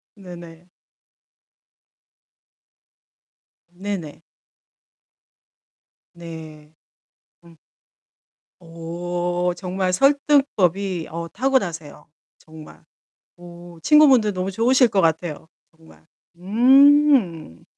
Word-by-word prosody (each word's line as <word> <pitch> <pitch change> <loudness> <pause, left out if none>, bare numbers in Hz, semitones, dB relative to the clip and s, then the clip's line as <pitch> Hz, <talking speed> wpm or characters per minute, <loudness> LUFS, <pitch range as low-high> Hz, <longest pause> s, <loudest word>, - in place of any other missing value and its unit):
네네. 175 -2 -14 3.0
네네. 175 -4 -7 1.9
네. 160 -2 -12 0.7
응. 170 -1 -19 1.1
오 175 +2 -4
정말 185 0 -3
설득법이 200 - 0
어 170 +1 -6
타고나세요 175 - -3 0.3
정말. 155 0 -16 0.5
오 175 -1 -14
친구분들 270 - +4
너무 185 0 -4
좋으실 245 +5 +2
것 200 - 0
같아요 160 -2 -2 0.3
정말. 160 -1 -21 0.3
음. 245 - +2
175 Hz, 130 characters per minute, -21 LUFS, 165-215 Hz, 3.0 s, 친구분들